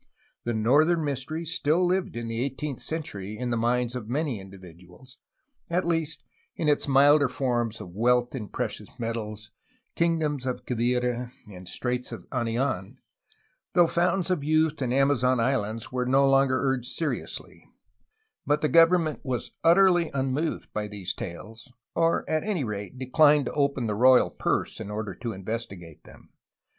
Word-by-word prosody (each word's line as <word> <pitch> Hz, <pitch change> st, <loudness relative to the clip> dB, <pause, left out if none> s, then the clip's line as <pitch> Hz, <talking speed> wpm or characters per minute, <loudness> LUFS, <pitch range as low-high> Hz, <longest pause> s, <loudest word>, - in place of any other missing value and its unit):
The 120 Hz, -, 0 dB
' -, -, -3 dB
'Northern 150 Hz, +10 st, +3 dB
Mystery" 145 Hz, +4 st, -3 dB
still 160 Hz, +2 st, +1 dB
lived 185 Hz, -4 st, 0 dB
in 120 Hz, -1 st, -4 dB
the 115 Hz, +1 st, -2 dB
eighteenth 140 Hz, 0 st, -4 dB
century 110 Hz, -, -4 dB
in 125 Hz, +1 st, -3 dB
the -, -, +1 dB
minds 120 Hz, +1 st, 0 dB
of 115 Hz, -3 st, -6 dB
many 140 Hz, -3 st, -1 dB
individuals, 95 Hz, -, -14 dB, 0.2 s
— 280 Hz, -, -51 dB
at 175 Hz, +1 st, 0 dB
least 165 Hz, -2 st, -1 dB, 0.3 s
in 160 Hz, -, -2 dB
its 145 Hz, -1 st, +2 dB
milder 140 Hz, +1 st, +5 dB
forms 120 Hz, -4 st, -1 dB
of 90 Hz, -, -9 dB
wealth 120 Hz, +3 st, +2 dB
in 115 Hz, -6 st, -5 dB
precious 105 Hz, -4 st, -4 dB
metals, 110 Hz, -3 st, -5 dB, 0.4 s
kingdoms 155 Hz, -5 st, 0 dB
of 125 Hz, -1 st, -4 dB
Quivira, 125 Hz, 0 st, -1 dB, 0.2 s
and 90 Hz, -1 st, -10 dB
straits 125 Hz, +3 st, -2 dB
of -, -, -8 dB
Anian, 120 Hz, -5 st, -2 dB, 0.8 s
though 175 Hz, -, +6 dB
fountains 180 Hz, +2 st, +1 dB
of 170 Hz, -6 st, 0 dB
youth 155 Hz, 0 st, +1 dB
and 125 Hz, -2 st, 0 dB
Amazon 130 Hz, -2 st, +3 dB
islands 115 Hz, -3 st, -1 dB
were 125 Hz, -1 st, -1 dB
no 135 Hz, +2 st, +4 dB
longer 135 Hz, -1 st, +3 dB
urged 130 Hz, -3 st, -1 dB
seriously, 160 Hz, -3 st, -4 dB, 0.4 s
— 440 Hz, 0 st, -49 dB
but 145 Hz, +1 st, +2 dB
the 150 Hz, -, +1 dB
government 165 Hz, -1 st, +4 dB
was 125 Hz, -4 st, -3 dB
utterly 175 Hz, 0 st, +5 dB
unmoved 135 Hz, +4 st, -2 dB
by 105 Hz, 0 st, -2 dB
these 100 Hz, -3 st, -4 dB
tales, 115 Hz, +5 st, -9 dB, 0.2 s
or 165 Hz, 0 st, +1 dB
at 155 Hz, 0 st, 0 dB
any 200 Hz, -8 st, -1 dB
rate 105 Hz, +2 st, -5 dB
declined 145 Hz, +2 st, +4 dB
to -, -, -3 dB
open 140 Hz, -4 st, 0 dB
the 105 Hz, -, -1 dB
royal 125 Hz, +4 st, +5 dB
purse -, -, -1 dB
in -, -, -6 dB
order 105 Hz, -2 st, -4 dB
to 115 Hz, +3 st, -5 dB
investigate 95 Hz, -5 st, -6 dB
them. -, -, -17 dB
130 Hz, 160 wpm, -26 LUFS, 115-155 Hz, 0.8 s, though